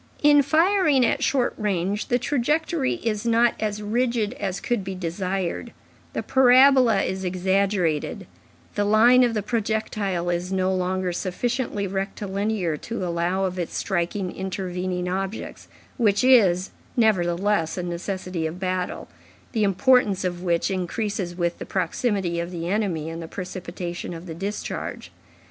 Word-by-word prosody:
In 290 0 +7
firing 310 -1 +3
at 280 +4 0
short 260 -3 +1
range, 200 -1 -1
the 245 - +2
trajectory 295 +3 0
is 215 -2 -1
not 235 0 +3
as 210 -1 -2
rigid 235 0 0
as 195 -2 -2
could 240 -5 -1
be 190 0 -5
desired, 185 +4 -3 0.4
the - - -2
parabola 255 -4 +5
is 190 0 -3
exaggerated, 185 -3 0 0.5
the 205 - 0
line 225 +5 +6
of 235 -2 +1
the 210 - -1
projectile 210 -5 -1
is 175 +2 -2
no 190 0 +1
longer 185 0 -1
sufficiently 210 +4 -2
rectilinear 195 -2 -2
to 225 +2 -4
allow 175 +3 0
of 185 -1 -3
its 175 - -3
striking 180 0 -2
intervening 185 -1 -3
objects, 195 +3 -4 0.3
which 210 -3 +2
is, 195 -8 +5 0.3
nevertheless, 190 -5 +2
a 180 - -2
necessity 175 -1 -3
of 165 +3 -7
battle, 185 -1 -2 0.4
the 220 -4 +1
importance 205 -1 +3
of 175 -1 -2
which 175 0 0
increases 190 0 -2
with 175 -1 -1
the - - -4
proximity 185 -1 -1
of 170 0 -3
the 170 -2 -5
enemy 185 -6 -1
and 165 +1 -5
the 165 - -6
precipitation 180 -1 -6
of 165 +2 -9
the 165 - -6
discharge. 195 +5 -5
195 Hz, 140 wpm, -24 LUFS, 180-225 Hz, 0.5 s, In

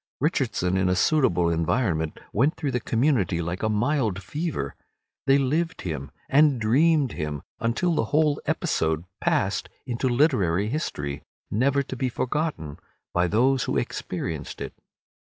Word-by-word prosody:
Richardson 120 - +1
in 95 -1 +2
a 90 - +2
suitable 90 - +3
environment 80 -1 0
went 140 - +2
through 145 -4 -2
the 125 - 0
community 115 - +1
like 85 +2 -3
a 110 - +1
mild 110 -3 0
fever. 145 - -3 0.5
They 135 0 +6
lived 155 +5 0
him, 75 -6 -4 0.2
and 145 -2 +4
dreamed 140 +4 +3
him, 75 -4 -4 0.2
until 120 +10 +1
the 135 - +1
whole 150 +3 +2
episode 80 +1 0
passed - - 0 0.2
into 125 +2 -1
literary 110 - +2
history, 75 - -3 0.3
never 140 +5 +2
to 130 - -6
be 130 0 -1
forgotten 125 - -2 0.3
by 90 0 +2
those 125 +7 +2
who - - 0
experienced 75 -3 -4
it. - - -5
120 Hz, 140 wpm, -25 LUFS, 90-140 Hz, 0.5 s, They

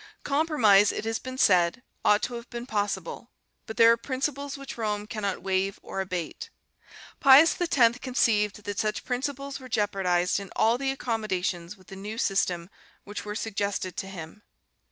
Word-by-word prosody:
Compromise, 265 -10 +4
it - - -5
has 225 0 -1
been 255 0 -7
said, 180 -1 +3 0.2
ought 210 0 +4
to 245 - -2
have 235 +1 -7
been 240 0 -6
possible, 205 -1 -3 0.4
but 220 - -7
there 230 0 +8
are - - +5
principles 275 +3 -3
which 275 -1 -8
Rome 210 -2 -2
cannot 205 -4 -3
waive 190 0 -1
or 195 - -4
abate. 180 -4 -5 0.7
Pius 280 +4 +7
X 250 -8 +3
conceived 210 -5 +1
that 205 0 -4
such 215 -1 -1
principles 275 +2 -3
were 260 -1 -11
jeopardized 195 -5 +1
in 200 -1 -8
all 230 +2 +3
the 275 -1 -1
accommodations 210 -8 -2
with 185 - -20
the 195 - -11
new 205 +3 -7
system 180 -4 0 0.3
which 205 0 -7
were 210 0 -5
suggested 200 -4 -2
to 195 - -3
him. 185 +1 -9
210 Hz, 165 wpm, -27 LUFS, 195-250 Hz, 0.7 s, there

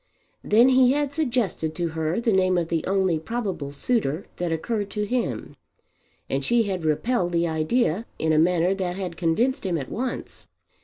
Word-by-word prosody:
Then 230 +5 +5
he 255 0 +5
had 290 -1 -1
suggested 235 - -1
to 170 -2 -1
her 160 +3 -1
the 230 -2 +1
name 185 -1 +3
of 170 -2 -1
the 165 -1 0
only 190 -4 +1
probable 190 -7 -4
suitor 165 - 0
that 175 -1 -2
occurred 205 +5 -2
to 210 0 -2
him, 205 - -2 0.7
and 135 +1 -2
she 235 - +3
had 190 -5 -3
repelled 175 +4 0
the 170 0 +2
idea 170 +6 0
in 160 0 +1
a 155 - +4
manner 175 +2 +3
that 185 -2 -3
had 185 -3 -4
convinced 225 - +1
him 180 -4 0
at 135 -4 -5
once. 250 +1 -5
185 Hz, 175 wpm, -24 LUFS, 165-235 Hz, 0.7 s, Then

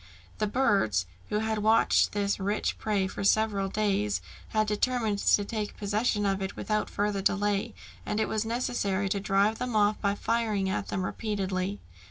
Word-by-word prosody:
The 215 - +1
birds, 200 - +2 0.2
who 210 - 0
had 220 0 -1
watched 220 +2 +4
this 205 -1 0
rich 200 +2 -1
prey 205 -3 0
for 190 - -5
several 200 -1 +2
days, 190 - 0 0.3
had 215 0 +1
determined 215 0 0
to 205 - +3
take 215 -1 -4
possession 205 +1 0
of 195 -1 0
it 190 0 -4
without 215 -1 -1
further 205 -1 -1
delay, 200 0 0 0.3
and 210 0 -2
it 220 - +1
was 215 -1 -1
necessary 220 -4 -1
to 200 - 0
drive 200 +2 +2
them 250 -2 -3
off 210 0 +3
by 200 -1 +1
firing 215 -3 0
at 195 - -2
them 185 -2 -2
repeatedly. 195 -2 -2
205 Hz, 170 wpm, -28 LUFS, 195-215 Hz, 0.3 s, watched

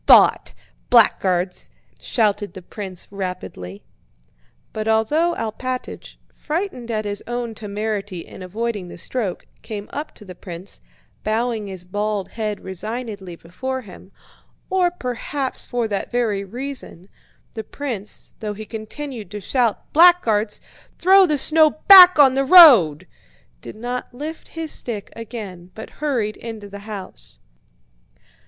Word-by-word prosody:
"Thought... - - +6 0.3
Blackguards..." 185 -6 +2 0.3
shouted 210 -3 0
the 185 - -9
prince 190 -2 -6
rapidly. 100 - -6 0.9
But 215 0 -4
although 295 +11 +2
Alpátych, 250 +3 -5 0.2
frightened 305 -7 -4
at 215 -2 -2
his 205 -1 -3
own 240 -1 -3
temerity 205 -3 -4
in - - -12
avoiding 205 +1 -4
the - - -10
stroke, 205 +1 -4 0.2
came 215 -2 -7
up 295 +2 -5
to 210 - -14
the 185 - -9
prince, 175 +1 -10 0.4
bowing 225 -1 -1
his 185 -2 -7
bald 205 +1 -2
head 215 -2 -4
resignedly 200 -1 -6
before 260 +11 -5
him, 190 -3 -14 0.6
or 370 -2 +3
perhaps 265 -3 -2
for 240 -2 -1
that 200 -2 -3
very 225 -5 0
reason, 240 -4 -6 0.5
the 220 - -5
prince, 225 -5 -6
though 210 -2 -4
he 215 +1 -8
continued 225 0 -7
to 210 +2 -6
shout: 235 +2 -1
"Blackguards!... 240 -12 +4 0.4
Throw 380 +1 +6
the 300 -2 +1
snow 315 +3 +5 0.2
back 365 -3 +11
on 275 -3 +7
the 270 +1 +1
road!" 240 - +8 0.6
did - - -9
not 245 +2 -5
lift 310 +5 -7
his 320 -1 -3
stick 215 -5 -5
again 205 -6 -8
but 220 - -9
hurried 240 -8 -1
into 220 -3 -8
the 200 0 -9
house. 190 - -8
220 Hz, 130 wpm, -21 LUFS, 200-255 Hz, 0.9 s, back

